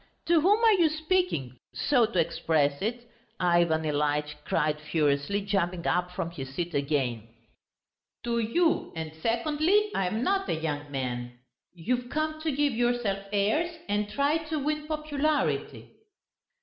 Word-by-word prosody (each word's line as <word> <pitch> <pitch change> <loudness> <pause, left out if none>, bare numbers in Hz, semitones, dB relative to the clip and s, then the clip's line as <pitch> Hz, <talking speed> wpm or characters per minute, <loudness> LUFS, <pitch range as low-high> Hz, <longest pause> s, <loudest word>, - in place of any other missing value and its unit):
To 335 -2 +4
whom 405 +6 +4
are 450 - +7
you 345 -5 +4
speaking, 310 - -1 0.2
so 245 -6 +3
to 230 - -5
express 145 -3 +1
it?" 235 +3 -3 0.3
Ivan 170 -3 +3
Ilyitch 150 0 0
cried 150 -1 0
furiously, 150 +5 0
jumping 185 -3 -1
up 180 0 +1
from 170 -1 -4
his 135 -4 -8
seat 175 +1 -3
again. 135 -6 -1 1.0
"To 235 -1 0
you; 320 +10 +1
and 160 -1 -4
secondly, 310 - +2
I 190 - 0
am 215 +6 -1
not 390 +3 +1
a - - +1
young 150 -2 -3
man.... 120 -2 -4 0.4
You've 245 +8 -2
come 310 +1 -2
to 315 0 0
give 285 0 +1
yourself 240 -4 0
airs 310 +13 +1
and 205 0 0
try 280 +7 +1
to 315 - -1
win 300 +1 -2
popularity." 305 -1 -1
205 Hz, 145 wpm, -28 LUFS, -, 1.0 s, are